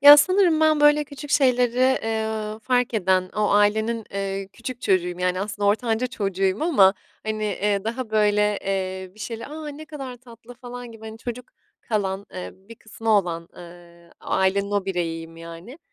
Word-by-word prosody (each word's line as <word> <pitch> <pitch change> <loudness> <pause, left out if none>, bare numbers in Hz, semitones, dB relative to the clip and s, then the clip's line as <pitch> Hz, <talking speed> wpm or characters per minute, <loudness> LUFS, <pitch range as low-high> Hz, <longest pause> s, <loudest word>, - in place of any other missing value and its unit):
Ya, 290 +1 +11
sanırım 365 0 +4
ben, 310 -1 +4
böyle, 295 0 +5
küçük 285 +1 -9
şeyleri, 250 -4 +3 0.3
eee, 220 -1 -2
fark 250 -1 +1
eden, 185 -2 +2
o 210 0 +2
ailenin, 220 +2 +2
eee, 195 0 -3
küçük 245 +1 -7
çocuğuyum, 180 -2 +1
yani, 180 0 0
aslında 205 0 -2
ortanca 225 +3 +1
çocuğuyum 195 -2 -1
ama, 205 - +5 0.3
hani, 215 0 -2
eee, 205 0 0
daha, 235 +1 -3
böyle, 210 -1 +2
eee, 190 -1 -2
bir 215 - -16
şeyle, 230 +1 -5
"A, 305 +1 -7
ne 295 +2 -8
kadar 270 -5 -7
tatlı!" 235 -1 -14
falan 245 -1 -9
gibi, 220 0 -13
hani, 220 0 -9
çocuk 240 +2 -6 0.4
kalan, 200 -3 -2
eee, 185 - -5
bir 195 +5 -15
kısmı 225 0 -5
olan, 175 -5 +1
ııı, 170 -1 -14
ailenin 200 +1 +1
o 205 -2 0
bireyiyim, 165 -3 -3
yani. 170 - -10
215 Hz, 165 wpm, -24 LUFS, 190-245 Hz, 0.4 s, Ya